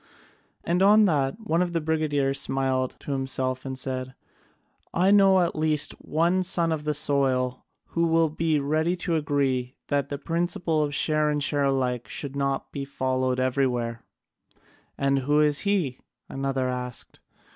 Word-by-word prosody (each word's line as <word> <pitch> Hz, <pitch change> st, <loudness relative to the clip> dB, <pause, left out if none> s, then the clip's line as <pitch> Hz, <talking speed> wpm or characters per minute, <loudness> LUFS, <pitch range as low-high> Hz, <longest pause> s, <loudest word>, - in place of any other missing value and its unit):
And 175 Hz, +2 st, 0 dB
on 210 Hz, +2 st, +6 dB
that 145 Hz, -2 st, 0 dB
one 180 Hz, -6 st, 0 dB
of 175 Hz, -1 st, -1 dB
the 165 Hz, -, +1 dB
brigadiers 150 Hz, -3 st, 0 dB
smiled 130 Hz, -1 st, -1 dB
to -, -, -6 dB
himself 130 Hz, -1 st, -2 dB
and 130 Hz, 0 st, -5 dB
said: 130 Hz, -1 st, -5 dB, 0.8 s
"I 185 Hz, +3 st, +4 dB
know 195 Hz, -2 st, +6 dB
at 170 Hz, 0 st, 0 dB
least 155 Hz, -1 st, +2 dB
one 170 Hz, +4 st, +1 dB
son 170 Hz, -2 st, +1 dB
of 155 Hz, -2 st, -3 dB
the 150 Hz, -1 st, 0 dB
soil 130 Hz, -3 st, 0 dB, 0.2 s
who 170 Hz, 0 st, +1 dB
will 165 Hz, -1 st, +2 dB
be 160 Hz, -1 st, +1 dB
ready 155 Hz, +5 st, 0 dB
to 175 Hz, -1 st, -2 dB
agree 135 Hz, -4 st, 0 dB
that 140 Hz, -1 st, 0 dB
the 140 Hz, -, -3 dB
principle 165 Hz, 0 st, -1 dB
of 145 Hz, -1 st, -1 dB
share 155 Hz, 0 st, +1 dB
and 150 Hz, -1 st, 0 dB
share 145 Hz, -1 st, +1 dB
alike 125 Hz, -4 st, 0 dB
should 140 Hz, +3 st, -5 dB
not 140 Hz, -1 st, -2 dB
be 140 Hz, -, -4 dB
followed 130 Hz, -2 st, -1 dB
everywhere." 125 Hz, -3 st, 0 dB, 1.0 s
"And 140 Hz, 0 st, +1 dB
who 145 Hz, +3 st, +2 dB
is 150 Hz, -1 st, +2 dB
he?" 180 Hz, -11 st, 0 dB, 0.3 s
another 135 Hz, -1 st, -2 dB
asked. 125 Hz, -1 st, -5 dB
145 Hz, 155 wpm, -25 LUFS, 130-160 Hz, 1.0 s, on